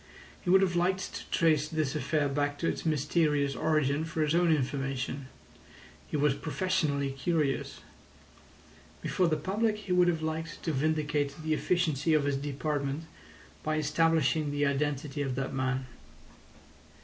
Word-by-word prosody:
He 180 - -4
would 190 +1 +6
have 180 -2 +1
liked 185 +2 0
to - - -7
trace 155 -3 +3
this 155 -3 -1
affair 150 -1 +1
back 145 +1 -1
to 165 - -1
its - - -2
mysterious 150 -2 +1
origin 155 0 +1
for 160 -1 -1
his 150 0 +1
own 170 0 +4
information. 135 -2 -1 0.8
He - - -2
was 145 -1 +3
professionally 155 -3 -1
curious. 140 0 -1 1.2
Before 180 - +1
the 155 -2 +1
public 210 +7 0
he 205 -3 -7
would 180 0 +5
have 165 -2 0
liked 160 +1 -4
to 160 - 0
vindicate 150 0 0
the 155 0 +1
efficiency 160 -2 +1
of 150 - +3
his 140 -1 0
department 145 +1 -2 0.6
by 155 0 -1
establishing 155 0 +2
the 145 0 0
identity 145 0 -1
of 135 -3 -1
that 135 +1 -3
man. 130 0 -1
150 Hz, 150 wpm, -30 LUFS, 140-165 Hz, 1.2 s, would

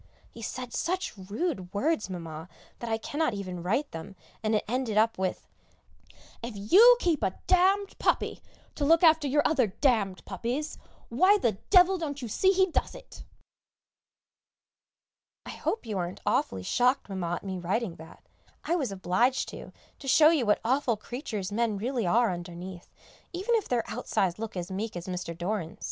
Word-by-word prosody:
He 230 - -11
said 250 +1 -5
such 370 +2 -2
rude 200 - -4
words, 280 0 0
Mamma, 165 -2 -7 0.3
that 235 - -5
I 225 - +1
cannot 285 +1 -1
even 185 -3 -5
write 225 - -1
them, 165 +4 -8 0.3
and 220 0 +1
it 210 - +1
ended 240 -2 -1
up 225 -1 +3
with, 190 -1 -2 0.9
"If 235 -2 -6
you 400 - +7
keep 335 - +1
a 185 - -1
d - - +5 0.3
d - - -21
puppy - - 0 0.3
to 295 - -3
look 325 +4 +4
after 320 -3 +5
your 290 +2 +2
other 270 -7 +2
d 190 - -13
d 220 -9 +2
puppies, 245 - -4 0.3
why 370 - +5
the 240 - +1 0.2
devil 370 -1 +6
don't 290 -4 -4
you 245 - -5
see 375 - +2
he 380 0 +4
does - - -1
it!" - - -12 2.2
I - - -6
hope 450 - -3
you 210 -4 -3
aren't 175 +1 -4
awfully 95 -1 0
shocked, 250 - +2
Mamma, 180 -4 -2
at - - -8
me 190 -2 -4
writing 185 +1 -2
that; 160 +1 -14 0.4
I 340 - 0
was 275 - -1
obliged 195 +7 +1
to, - - -9 0.3
to 275 - -10
show 305 +3 +7
you 280 -9 +1
what 210 - +3
awful 255 -2 +1
creatures 215 -4 -5
men 220 -1 0
really 235 -1 -1
are 230 +3 +3
underneath, 175 +1 -8 0.4
even 385 +7 -1
if 445 -3 +1
their 240 -2 0
outsides 185 0 -1
look 220 -4 -5
as 180 +1 -4
meek 210 +3 -4
as 175 - -7
Mr. 180 -2 -5
Doran's. 175 -2 -3
225 Hz, 175 wpm, -28 LUFS, 185-290 Hz, 2.2 s, you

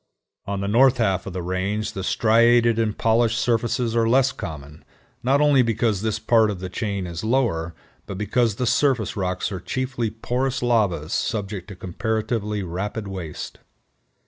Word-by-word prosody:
On 100 -1 -2
the 100 - -2
north 125 +5 +4
half 95 -7 0
of 95 - -5
the 90 -1 -4
range 100 +4 -2
the 95 - -5
striated 115 +2 +4
and 110 -2 0
polished 115 0 +2
surfaces 115 0 0
are 115 -1 +2
less 135 +2 +4
common, 75 - -8 0.4
not 135 +4 +2
only 145 -3 +5
because 115 -4 0
this 110 -1 -1
part 110 0 +3
of 100 -3 -4
the 95 0 -5
chain 100 -1 -3
is 85 +1 -6
lower, 110 -9 0 0.3
but 100 - -6
because 110 +2 +1
the 125 - -1
surface 125 -4 +1
rocks 90 0 -2
are 95 - -4
chiefly 120 +3 -2
porous 125 +4 -2
lavas 100 -10 +1
subject 100 -4 -2
to 100 - -9
comparatively 105 +2 -2
rapid 100 +4 -4
waste. 90 -6 -7
110 Hz, 165 wpm, -23 LUFS, 95-120 Hz, 0.4 s, only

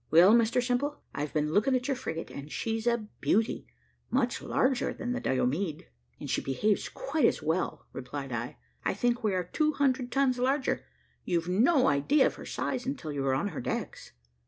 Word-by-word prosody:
"Well, 175 +6 +7
Mr 235 +1 +3
Simple, 255 +4 0 0.2
I've 145 +1 -3
been 150 0 0
looking 210 +9 +3
at 250 +1 -1
your 280 - +2
frigate, 165 -10 -5
and 140 +2 -8
she's 225 0 -2
a 235 -2 +1
beauty 220 +2 +1 0.4
much 250 -2 0
larger 260 -1 +1
than 245 - -4
the 250 - -1
Diomede." 145 - -1 0.3
"And - - -6
she - - 0
behaves 200 +10 0
quite 410 -12 0
as - - +2
well," 160 +4 -1
replied 135 +1 -6
I. 120 +1 -4 0.3
"I - - 0
think 240 +3 0
we 205 -3 +1
are 180 - 0
two 305 - 0
hundred 260 -3 +1
tons 270 -2 +2
larger. 265 +2 +1 0.4
You've 170 -1 -1
no 255 - +4
idea 205 - +4
of - - +1
her - - -10
size 255 -2 -2
until 265 - -3
you 140 -2 -2
are 130 - +3
on 175 +10 0
her 160 - -5
decks." - - -4
225 Hz, 190 wpm, -29 LUFS, 155-255 Hz, 0.4 s, Well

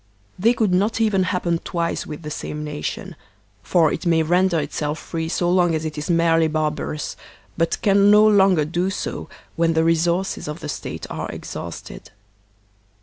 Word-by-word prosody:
They 230 +6 +4
could 215 -6 +1
not 205 +5 +1
even 205 -4 +2
hap 180 -1 -1
pen 170 -1 +1
twice 170 -1 -3
with 150 +2 -7
the 150 - -5
saime 150 0 -5
nation; 150 +4 -5 0.5
for 165 -4 +2
it - - -4
may 165 -1 +3
render 175 +1 +2
itself 150 +1 -3
free 165 -1 -4
so 175 +1 0
long 175 -2 +3
as 160 0 -3
it 155 -1 -4
is 150 +3 -5
merely 165 -1 +3
barbarous, 155 -1 -2 0.4
but 165 -1 0
can 200 0 +5
no 210 +1 +7
longer 190 -6 +4
do 175 +4 -1
so 195 - -5 0.3
when 165 0 +2
the 160 0 +2
resources 170 +3 +1
of 150 +2 -5
the 150 - -6
State - - -5
are - - -4
exhausted. - - -8
170 Hz, 175 wpm, -22 LUFS, 155-185 Hz, 0.5 s, no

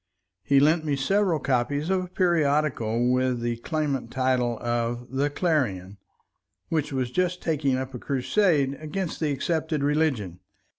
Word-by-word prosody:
He 140 +8 +3
lent 155 +3 +3
me 150 -2 0
several 185 +5 +1
copies 145 +4 0
of 185 -1 +1
a - - -7
periodical 145 - +1
with 125 -1 +1
the 120 0 -2
clamant 140 -3 -2
title 125 -2 0
of 120 +1 -2
The 140 +2 0
Clarion, 110 - -1 0.7
which 155 -3 -1
was 130 -3 -2
just 180 +3 0
taking 140 -5 0
up 130 0 -5
a 125 - -6
crusade 140 - +1
against 165 +3 -4
the 155 -2 0
accepted 155 +1 -1
religion. 140 - 0
140 Hz, 145 wpm, -25 LUFS, 125-160 Hz, 0.7 s, He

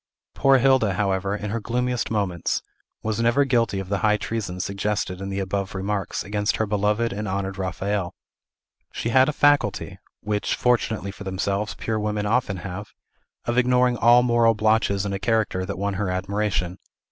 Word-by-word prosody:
Poor 135 -1 +4
Hilda, 130 -6 +3
however, 95 0 0
in 105 -1 -5
her 115 - -1
gloomiest 125 +2 -1
moments, 100 -6 -1 0.4
was 110 0 -1
never 120 +5 +3
guilty 115 -6 +1
of 95 - -5
the 100 +1 -1
high 105 -1 +3
treason 100 -4 -4
suggested 100 -1 -2
in 95 - -4
the 95 - -3
above 100 0 -2
remarks 100 +1 -2
against 105 +1 -1
her 110 - 0
beloved 105 +2 0
and 105 +1 -4
honored 95 0 -3
Raphael. 95 +1 -2 0.8
She 115 - -3
had 130 +3 +5
a - - +2
faculty 145 -1 +1 0.2
(which, 105 -1 -1
fortunately 110 -5 0
for 100 - -10
themselves, 100 +2 -2
pure 110 -1 -2
women 105 0 -1
often 105 -3 +1
have) 95 +2 -5 0.6
of 120 +1 +2
ignoring 125 0 +3
all 120 +1 +5
moral 120 -2 +3
blotches 110 -2 +2
in 100 - -2
a 95 - -2
character 110 -4 0
that - - -4
won 100 +1 -1
her 95 0 -2
admiration. 95 -1 -1
105 Hz, 170 wpm, -24 LUFS, 95-115 Hz, 0.8 s, had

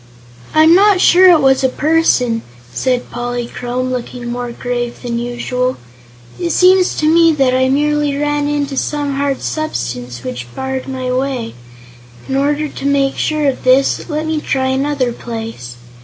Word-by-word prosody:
"I'm 315 +1 +6
not 400 +1 +5
sure 365 +1 +6
it 335 -4 +5
was 270 0 +3
a 260 - +3
person," 265 -6 +1 0.3
said 250 -2 -1
Polychrome, 245 +1 -4
looking 245 -1 -5
more 245 0 -4
grave 240 0 -4
than 235 -1 -2
usual. 250 +1 -2 0.6
"It 345 - -1
seems 370 0 +4
to 305 - 0
me 330 +1 +5
that 270 -4 +2
I 260 0 +2
merely 295 +1 +1
ran 295 0 0
into 290 -2 -2
some 290 -1 -2
hard 280 -1 -1
substance 125 - -4
which 125 -1 -6
barred 265 0 -4
my 260 -1 -3
way. 255 -3 -2 0.7
In 265 - -2
order 290 +2 0
to 275 - -8
make 275 -1 +1
sure 305 -2 0
of 270 - -2
this, 260 +6 +2
let 305 0 -2
me 315 -1 -1
try 260 -2 -1
another 265 -2 0
place." 225 - -7
265 Hz, 155 wpm, -16 LUFS, 245-295 Hz, 0.7 s, I'm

